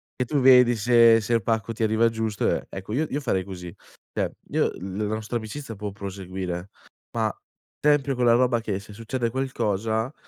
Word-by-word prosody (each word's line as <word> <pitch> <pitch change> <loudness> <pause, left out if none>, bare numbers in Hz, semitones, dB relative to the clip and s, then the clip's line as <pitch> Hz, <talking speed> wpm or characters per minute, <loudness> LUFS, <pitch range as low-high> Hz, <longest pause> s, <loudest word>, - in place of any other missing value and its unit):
e 125 - -1
tu 145 +3 0
vedi 125 -2 +7
se 115 +1 +6
se 115 +2 -2
il 115 - +3
pacco 115 +2 -1
ti 110 - -8
arriva 110 +1 +3
giusto 110 -2 -1
e - - -1
ecco 95 +3 -7
io 155 +5 0
io 145 - -1
farei 95 -10 0
così. 90 -3 -8 0.4
Cioè - - 0 0.2
io - - +2
l 95 +1 -6
la 105 0 -1
nostra 110 +2 -3
amicizia 115 +2 -7
può 105 0 -5
proseguire, 95 -2 -5 0.5
ma - - 0 0.5
tempio 145 -2 +3
quella 120 -1 +4
roba 120 -1 +3
che 100 -3 -2
se 105 +1 -13
succede 115 +2 -3
qualcosa, 115 -2 -1
115 Hz, 185 wpm, -25 LUFS, 100-120 Hz, 0.5 s, vedi